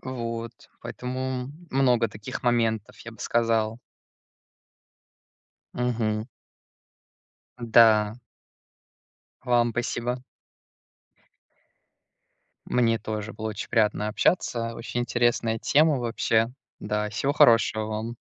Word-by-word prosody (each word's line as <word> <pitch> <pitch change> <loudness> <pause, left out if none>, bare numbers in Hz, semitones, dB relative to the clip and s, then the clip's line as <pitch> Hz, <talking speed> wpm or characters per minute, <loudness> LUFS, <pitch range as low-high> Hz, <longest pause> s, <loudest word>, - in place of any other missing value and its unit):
Вот, 115 -3 -6
поэтому 130 0 -4 0.2
много 125 -4 +3
таких 105 0 -7
моментов, 115 -3 0
я 115 - -9
бы 110 - -17
сказал. 115 -1 +1 2.0
Мгм. 110 -3 -1 1.4
Да. 110 -2 +5 1.3
Вам 120 -1 +2
спасибо. 120 +1 -2 2.4
Мне 115 -2 +2
тоже 110 0 -5
было 110 0 -5
очень 105 -1 -6
приятно 105 -2 +1
общаться. 115 -2 0
Очень 120 +1 -4
интересная 120 -2 +1
тема, 150 +1 +3
вообще. 115 -1 +1 0.3
Да 105 0 -2
всего 135 +7 -1
хорошего 115 -5 +4
вам! 110 +2 -4
115 Hz, 85 wpm, -26 LUFS, 110-120 Hz, 2.4 s, Да